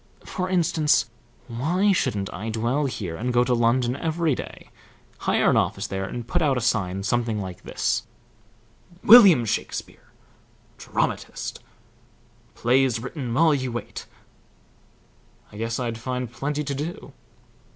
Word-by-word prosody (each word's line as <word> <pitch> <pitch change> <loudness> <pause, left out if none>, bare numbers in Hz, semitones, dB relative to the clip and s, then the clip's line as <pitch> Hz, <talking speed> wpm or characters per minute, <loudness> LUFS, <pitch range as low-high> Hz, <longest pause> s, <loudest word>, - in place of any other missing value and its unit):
For 185 0 -3
instance, 165 -4 +2 0.4
why 170 - +1
shouldn't 100 - -1
I 110 +5 -5
dwell 120 +6 0
here 105 -10 -4
and 125 +8 -2
go 120 0 +3
to 125 0 0
London 120 +1 +2
every 160 0 0
day, - - -8 0.6
hire - - +3
an - - +3
office - - 0
there, 95 0 -3
and 120 +4 -6
put - - 0
out 140 -4 +2
a - - +1
sign 95 -5 -1
something 115 0 0
like 95 -3 -7
this: - - -2 1.0
WILLIAM 200 - +8
SHAKESPEARE 105 - -4 0.7
DRAMATIST - - -3 1.0
Plays 125 -1 +2
written 125 +1 -5
while 155 +5 +4
you 130 -3 -2
wait 120 -1 -6 1.4
I 105 - -11
guess 115 +2 -3
I'd 115 -2 -3
find 125 0 -4
plenty 145 +5 -3
to 140 -1 -3
do." 150 +6 -6
125 Hz, 135 wpm, -24 LUFS, 115-150 Hz, 1.4 s, WILLIAM